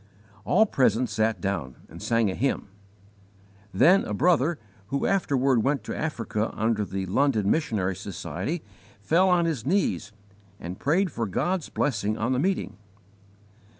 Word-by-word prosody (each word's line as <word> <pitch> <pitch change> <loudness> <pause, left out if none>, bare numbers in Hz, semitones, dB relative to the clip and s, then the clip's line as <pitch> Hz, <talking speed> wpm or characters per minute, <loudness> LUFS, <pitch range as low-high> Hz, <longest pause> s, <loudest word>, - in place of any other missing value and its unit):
All 220 +4 +4
present 125 - +1
sat 110 -1 0
down 85 -9 -3
and - - -12
sang 115 -4 +1
a - - -4
hymn. 130 -1 -1 1.0
Then 175 - +5
a 105 - -3
brother 160 - +2 0.3
who 140 +5 -1
afterward 135 -10 +2
went 140 -4 0
to - - -5
Africa 115 -8 -2
under 110 -1 0
the 95 -1 -4
London 105 0 +1
Missionary 105 - 0
Society 105 - -5 0.4
fell 170 - +3
on 175 -2 +3
his 155 -9 -2
knees 140 - 0 0.5
and 90 +2 -7
prayed 175 +6 +1
for 115 -4 -2
God's 175 - -1
blessing 110 -5 -1
on 120 +4 0
the 125 - 0
meeting. 185 +6 -1
120 Hz, 145 wpm, -26 LUFS, 105-160 Hz, 1.0 s, Then